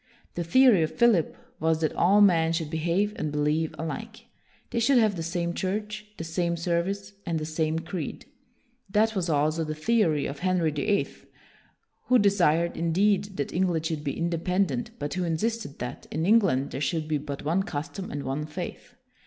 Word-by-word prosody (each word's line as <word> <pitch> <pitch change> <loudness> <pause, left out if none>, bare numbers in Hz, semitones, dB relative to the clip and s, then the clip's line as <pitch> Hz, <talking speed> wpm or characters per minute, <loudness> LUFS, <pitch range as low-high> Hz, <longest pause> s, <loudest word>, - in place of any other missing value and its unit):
The 175 - -2
theory 235 +2 +5
of 155 - +1
Philip 235 -9 +3 0.2
was 160 0 +1
that 155 - 0
all 200 +4 +4
men 165 -5 +4
should 160 -2 -2
behave 175 +6 0
and 155 - -2
believe 150 +2 0
alike. 220 +9 -6 0.5
They - - 0
should 255 +3 +4
have 215 -4 +3
the 170 - -4
same 170 +1 -2
church, 210 +3 -3
the - - -5
same 170 +1 -1
service, 185 +4 -2
and 170 -3 -2
the 155 - -3
same 155 0 -1
creed. 165 -1 -5 0.6
That 215 +3 +2
was 180 -3 -1
also 155 +2 +1
the 155 -1 -4
theory 160 -5 +2
of 140 0 -5
Henry 180 -3 +1
the 145 +6 -3
Eighth, 205 -1 -1 0.8
who 255 - +5
desired, 170 -5 +3
indeed, 195 +4 +1
that 140 - -3
England 175 -3 0
should 160 -2 -2
be 140 - -3
independent, 170 -4 0
but 145 0 -4
who 185 -1 -1
insisted 190 0 -2
that, 125 0 -6
in 160 +2 -2
England, 190 - +3
there 135 - -4
should 155 +1 -1
be 155 -1 0
but 140 -1 -6
one 170 +5 +2
custom 175 +3 -5
and 145 0 -4
one 140 +3 -3
faith. 155 - -7
170 Hz, 180 wpm, -27 LUFS, 155-195 Hz, 0.8 s, theory